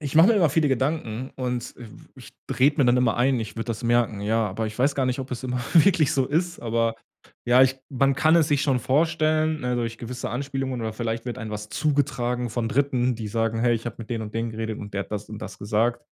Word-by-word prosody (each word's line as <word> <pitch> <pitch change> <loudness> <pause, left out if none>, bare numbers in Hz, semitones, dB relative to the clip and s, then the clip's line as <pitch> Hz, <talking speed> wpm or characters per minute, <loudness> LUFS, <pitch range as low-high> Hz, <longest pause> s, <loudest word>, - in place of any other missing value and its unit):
ich 145 -1 -5
mache 165 +5 +7
mir 230 - +5
immer 170 -8 +3
viele 155 0 +2
Gedanken 130 -2 -1
und 125 -2 -3
w 120 -2 -10 0.3
ich - - -13 0.3
rede 140 +4 +4
mir 140 - +5
dann 120 0 +4
immer 125 -3 +2
ein, 125 0 +2
ich 110 0 -6
würde 115 - -3
das 115 +1 -4
merken, 120 -3 +1
ja. 110 +2 +1
Aber 110 +4 -3
ich 110 +1 -7
weiß 135 +3 +2
gar 135 -2 0
nicht, 130 +1 -1
ob 130 0 -5
es 125 -1 -5
immer 125 -1 -2
wirklich 165 -3 +5
so 135 -2 +1
ist. 170 +4 -1
Aber, 115 -1 0 0.5
ja, 125 +2 +6
ich 130 0 +3
man 135 0 +2
kann 160 +4 +4
es 160 -3 +3
sich 145 -2 +2
schon 135 -3 +2
vorstellen, 155 +3 +1
ne, 125 0 -1
durch 115 -1 -2
gewisse 120 +2 -5
Anspielungen 135 -1 -3
oder 110 -1 -3
vielleicht 115 0 -3
wird 120 -2 -5
einem 110 -1 -6
was 105 0 -6
zugetragen 125 -5 0
von 115 0 -2
3., 130 -1 +1
die 110 -2 -5
sagen: 115 +1 -1
„Hey, 120 0 +3
ich 115 +1 -5
habe 120 - -5
mit 115 0 -9
den 115 -2 -2
und 105 0 -8
den 115 +1 -2
geredet 110 -1 -4
und 105 -1 -8
der 100 - -2
hat - - -14
das 105 0 -4
und 110 - -7
das 95 -3 -8
gesagt.“ 110 +4 0
125 Hz, 250 wpm, -24 LUFS, 115-140 Hz, 0.5 s, mache